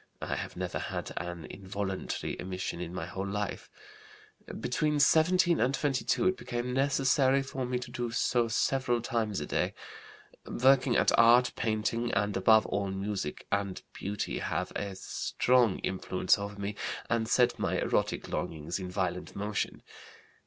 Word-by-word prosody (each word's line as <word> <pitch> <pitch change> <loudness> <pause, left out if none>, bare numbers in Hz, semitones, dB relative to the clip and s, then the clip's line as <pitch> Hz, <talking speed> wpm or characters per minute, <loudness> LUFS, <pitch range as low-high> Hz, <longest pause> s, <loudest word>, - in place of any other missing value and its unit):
(I - - -3
have - - -5
never - - -3
had - - -4
an 85 -2 -5
involuntary 95 +2 -4
emission 90 -1 -4
in 85 -1 -5
my 90 -2 -4
whole 95 +3 -4
life.) 105 +1 -3 0.9
Between 150 +4 0
17 170 +4 +4
and 130 +4 +2
22 145 +6 +1
it 185 - -2
became 120 +1 -3
necessary 135 0 +3
for 130 -1 -4
me 125 0 0
to 125 0 -7
do 120 -1 -3
so 120 0 +1
several 120 +1 +1
times 110 -5 -1
a 75 - -3
day. - - -1 0.7
Working 130 -1 +3
at - - +4
art, 120 +2 +6
painting, 115 +2 0
and 105 0 +1
above 110 +3 +5
all 100 -1 -1
music 95 -5 -3
and 100 -2 -1
beauty 100 +1 -3
have - - -2
a 100 -1 -3
strong 120 +3 +1
influence 95 0 +1
over 100 0 -6
me 100 +1 -3 0.3
and 115 -1 0
set 125 +1 +3
my - - 0
erotic - - 0
longings 80 +3 -3
in 90 -1 -5
violent 90 -1 -3
motion. 105 +1 -3
110 Hz, 150 wpm, -30 LUFS, 95-125 Hz, 0.9 s, art